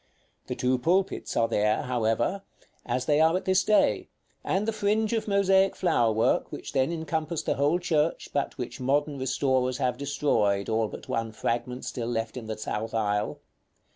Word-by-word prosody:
The - - -3
two 125 0 +1
pulpits 185 +8 0
are 115 - +3
there, 105 0 +1
however, 120 - 0 0.5
as 125 +1 -1
they 145 +1 +3
are 160 +3 +4
at - - -6
this 190 0 +3
day, 215 - +2 0.3
and 200 +3 0
the 225 - 0
fringe 215 +1 +1
of 225 -1 -1
mosaic 195 -1 +3
flower 140 -11 +2
work 110 +1 +1
which - - -7
then 135 +2 +2
encompassed 160 0 -3
the - - +1
whole 145 +5 +2
church, 160 -3 0
but 140 -1 -1
which 120 -1 -5
modern 140 +2 0
restorers 130 -1 0
have 125 -2 -1
destroyed, 135 -9 +1
all 110 0 +1
but - - -10
one 115 -1 -2
fragment 120 +3 -3
still 120 -2 -4
left 115 -1 -2
in 120 -3 -7
the 110 - -4
south 110 +1 -4
aisle. 105 -1 -1
130 Hz, 175 wpm, -27 LUFS, 115-170 Hz, 0.5 s, are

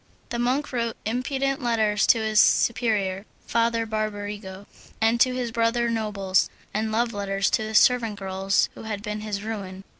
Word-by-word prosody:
The 235 - -3
monk 255 +4 0
wrote 235 -2 -1
impudent 265 +4 -1
letters 220 -4 +1
to - - +6
his 220 -1 +2
superior, 215 -6 +2 0.2
Father 230 0 +1
Barbarigo, 205 -2 -4 0.3
and 225 +1 +2
to 255 -1 +4
his 245 -2 -2
brother 235 +1 +1
nobles, 200 -4 0 0.2
and 215 +1 -1
love 230 +1 0
letters 195 -1 -1
to 220 - +1
the 215 0 -5
servant 230 -2 +4
girls 195 0 0
who - - -11
had 210 -2 -4
been 210 0 -4
his 210 -2 -4
ruin. 195 -4 -6
220 Hz, 160 wpm, -25 LUFS, 205-235 Hz, 0.3 s, to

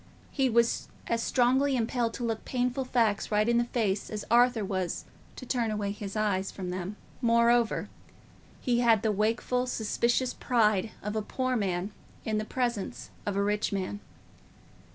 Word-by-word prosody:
He 270 -2 +2
was 235 0 +2 0.2
as 230 0 0
strongly 265 +3 +3
impelled 235 -1 0
to 245 - -5
look 225 -2 -2
painful 250 +1 -1
facts 225 -6 +1
right 210 +1 +3
in 235 0 +3
the 240 - +1
face 215 -5 -1
as 210 -1 -5
Arthur 240 -2 +4
was 185 -2 -2 0.3
to 255 - -8
turn 240 -2 0
away 210 -2 -1
his 205 -1 -6
eyes 200 -3 0
from 185 -2 -5
them. 185 +2 -4 0.3
Moreover, 235 -1 +3 0.7
he 240 -2 +1
had 230 -3 +4
the 220 - +2
wakeful 230 +4 0
suspicious 240 +2 0
pride 215 -4 +2
of 210 +1 -3
a 215 - +1
poor 255 +4 -1
man 190 -2 -1 0.3
in 215 -1 0
the 215 - -3
presence 240 -4 -3 0.2
of 205 - 0
a 200 - +2
rich 210 +1 0
man. 200 +1 -3
225 Hz, 165 wpm, -29 LUFS, 205-245 Hz, 0.7 s, Arthur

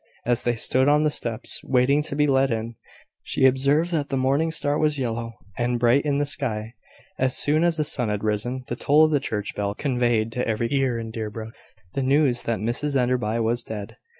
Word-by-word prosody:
As 120 -1 +1
they 120 0 0
stood 130 +3 +1
on 150 +1 +4
the 150 - +2
steps, 115 -5 -1
waiting 135 +3 +2
to 150 -2 -4
be 150 0 +3
let 135 -1 +2
in, 115 0 -3 0.5
she - - 0
observed 140 +6 +3
that 150 -4 -1
the 135 - -1
morning 140 +5 +1
star 145 -2 +1
was 150 -1 +2
yellow 115 -3 -3 0.2
and 120 0 0
bright 120 +5 +3
in 145 -1 +1
the 145 - +1
sky. 115 -6 -2 0.5
As 130 -1 +2
soon 155 +3 +3
as 170 -1 +1
the 155 - +1
sun 125 -6 0
had 105 0 -2
risen, 110 +5 -2
the 120 - -4
toll 150 +5 +4
of 155 - 0
the 145 - +2
church 105 -6 -4
bell 100 0 -3
conveyed 120 -5 0
to 125 +2 -2
every 115 +1 -1
ear 135 -3 +1
in 115 -1 -6
Deerbrook 110 0 -6 0.4
the 135 - -1
news 135 -2 +2
that 115 -1 0
Mrs 120 +7 -2
Enderby 125 -4 +1
was 115 +2 0
dead. 110 -2 -8
125 Hz, 210 wpm, -24 LUFS, 115-145 Hz, 0.5 s, on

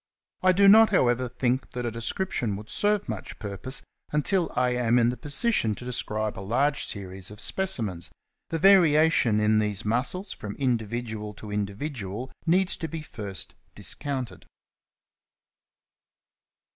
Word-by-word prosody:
I 185 - +5
do 200 +2 +5
not, 220 +2 +8
however, 125 - +2
think 125 +1 -1
that 125 0 -3
a 120 - -1
description 115 - -2
would 105 +2 -9
serve 210 -1 +1
much 110 -4 -6
purpose 105 +6 -4 0.3
until 165 +4 +1
I 125 0 +2
am 125 -1 +2
in 120 -1 +4
the 125 - -2
position 145 - 0
to 120 - -10
describe 110 -5 -2
a - - -5
large 135 +8 +1
series 95 -2 -5
of 105 0 -11
specimens; 115 - -1 0.4
the 165 - -1
varia 160 -4 +6
tion 110 -8 +3
in 105 0 +3
these 105 0 -1
muscles 130 - 0
from 105 -3 -6
individual 115 -4 -2
to 105 0 -9
individual 105 +2 -4 0.2
needs 185 +3 +3
to 165 - -4
be 160 0 -6
first 100 -9 -6 0.2
discounted. 135 -5 -4
120 Hz, 145 wpm, -26 LUFS, 105-155 Hz, 0.4 s, not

